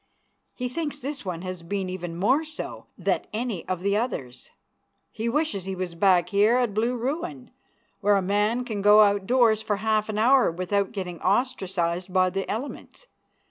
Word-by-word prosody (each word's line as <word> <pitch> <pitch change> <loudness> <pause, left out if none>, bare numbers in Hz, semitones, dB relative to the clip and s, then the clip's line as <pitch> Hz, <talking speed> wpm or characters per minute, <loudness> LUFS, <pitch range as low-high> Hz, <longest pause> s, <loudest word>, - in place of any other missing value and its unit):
He 250 - -3
thinks 290 +3 -3
this 285 +1 -5
one 180 -3 -5
has 185 -2 -5
been 190 +3 -3
even 175 -2 -5
more 255 - +3
so 310 0 -7
that - - -1
any 220 -5 -3
of 185 -1 -2
the 200 +1 +1
others. 170 - -3 0.6
He 230 +2 -3
wishes 270 - -1
he 190 0 -3
was 185 -2 -4
back 175 0 +3
here 205 +4 +4
at 245 -5 +1
Blue 230 +4 0
Ruin, 240 - -4 0.5
where 205 0 +3
a 195 - +2
man 210 +6 +1
can 215 -5 -3
go 210 +1 +7
out 200 -2 +3
doors 235 -4 +4
for 210 -1 -1
half 215 +1 0
an 210 - -2
hour 255 +4 +5
without 185 +3 -1
getting 180 -5 -6
ostracized 190 -5 0
by 185 0 +3
the 195 +1 -3
elements. 270 - -6
205 Hz, 180 wpm, -25 LUFS, 185-240 Hz, 0.6 s, go